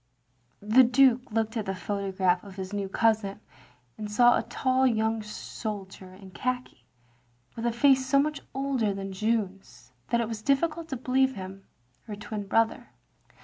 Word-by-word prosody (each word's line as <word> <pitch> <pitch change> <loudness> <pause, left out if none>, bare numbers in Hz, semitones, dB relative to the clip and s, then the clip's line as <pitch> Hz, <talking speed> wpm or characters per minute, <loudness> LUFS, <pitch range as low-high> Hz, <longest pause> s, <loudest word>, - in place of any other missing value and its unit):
The 220 +5 +6
Dtike 250 0 +4
looked 220 0 -1
at 220 -4 -3
the 195 - -2
photograph 190 -1 0
of 200 -2 -11
his 190 0 -6
new 200 -1 -2
cousin, 215 -1 +1 0.6
and 210 -1 -5
saw 240 +3 +6
a - - +1
tall 260 0 +1
young 220 -1 +1
soldier 200 -3 -7
in 190 0 -13
khaki^ 250 - -3 0.8
with 230 +1 -2
a - - +2
face 265 +2 +4
so 275 - +3
much 300 +1 +1
older 265 -7 0
than 195 0 -5
Jeanne's 190 - -3 0.2
that 235 - +2
it 230 - 0
was 220 -1 -5
diflScult 315 +6 0
to 265 - -4
believe 260 +2 +1
him 190 0 -9 0.4
her 210 - -5
twin 210 -1 -6
brother. 225 +2 +1
220 Hz, 160 wpm, -27 LUFS, 195-255 Hz, 0.8 s, The